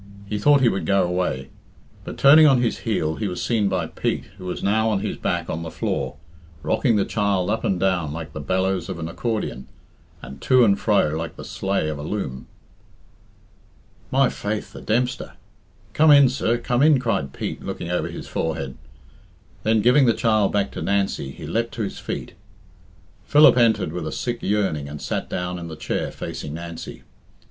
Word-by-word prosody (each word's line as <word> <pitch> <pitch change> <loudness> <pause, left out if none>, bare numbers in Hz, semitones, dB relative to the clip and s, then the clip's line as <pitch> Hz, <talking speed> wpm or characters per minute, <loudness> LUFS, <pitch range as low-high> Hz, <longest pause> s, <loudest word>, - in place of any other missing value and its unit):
He 105 +1 -3
thought 145 +5 +5
he 125 - +5
would 95 -4 -1
go 100 0 +3
away. 90 -7 -2 0.6
But - - -7
turning 155 +3 +8
on 135 -3 +5
his 120 -2 0
heel, 80 -8 -1
he 110 - -2
was 90 - -4
seen 110 -4 +1
by 90 -3 -1
Pete, - - -2 0.2
who 90 - -9
was 90 - -4
now 110 +3 +2
on 105 -3 0
his - - -3
back 85 -2 -2
on 80 - -3
the 80 - -5
floor, - - -3 0.5
rocking 115 - +2
the 100 - +2
child 100 -3 0
up 110 - -1
and 95 - 0
down 90 -6 0
like 80 -1 -7
the - - -5
bellows 95 +5 -1
of 95 - -4
an 80 -1 -4
accordion, 95 - -3 0.5
and 65 +2 -11
to 130 -2 +5
and 100 -2 +3
fro 105 -8 +2
like 80 +2 -4
the - - -9
sleigh 95 -5 -1
of 75 -1 -4
a - - -5
loom. 75 -6 -4 1.6
"My 135 0 +3
faith, 105 -2 -4
the - - -9
Dempster! 125 +3 -1 0.6
Come 155 +1 +4
in, 140 -3 +8
sir, 120 -2 0
come 120 +1 0
in," 150 -1 +6
cried 100 - -1
Pete, - - -5
looking 85 - -5
over 90 - 0
his - - -8
forehead. 80 -5 -3 0.9
Then, 110 +2 +2
giving 125 +4 +5
the 115 - +3
child 110 -3 +2
back 100 -1 0
to - - -6
Nancy, 100 -8 0
he - - -9
leapt 115 -1 -2
to 115 - -2
his 100 - -5
feet. - - -5 0.9
Philip 150 +1 +7
entered 110 -9 +2
with 85 -3 -4
a - - -4
sick 120 +6 -3
yearning 95 -9 -1
and 75 0 -7
sat - - -3
down 90 0 -3
in 85 - -7
the 80 - -7
chair - - -3
facing 75 - -6
Nancy. 85 0 -8
100 Hz, 190 wpm, -23 LUFS, 85-115 Hz, 1.6 s, turning